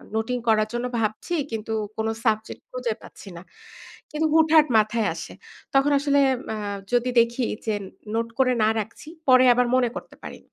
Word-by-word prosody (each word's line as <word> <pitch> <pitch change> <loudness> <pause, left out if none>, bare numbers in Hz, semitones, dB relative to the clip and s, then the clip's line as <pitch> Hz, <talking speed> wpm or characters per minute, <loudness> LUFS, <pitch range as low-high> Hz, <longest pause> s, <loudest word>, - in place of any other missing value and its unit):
Noting 225 +3 -1
করার 215 -1 +3
জন্য 240 +1 -2
ভাবছি 215 +10 -2 0.2
কিন্তু 225 0 -5 0.3
কোনো 220 0 -1
সাবজেক্ট 220 -1 -1
খুঁজে 250 -3 -2
পাচ্ছি 200 - -13
না। - - -9 0.7
কিন্তু 310 +1 0
হুটহাট 315 -1 +5
মাথায় 215 0 +1
আসে। - - -8 0.4
তখন 275 +2 +3
আসলে 285 0 +2 0.3
আ - - -4 0.4
যদি 245 +1 +2
দেখি 235 +2 +1 0.2
যে 220 - 0 0.4
নোট 230 0 0
করে 255 -1 +4
না 215 - +4
রাখছি 220 +7 -7 0.2
পরে 255 -1 +7
আবার 250 0 +2
মনে 250 -2 +2
করতে - - -9
পারি। - - -8
235 Hz, 165 wpm, -24 LUFS, 220-260 Hz, 0.7 s, পরে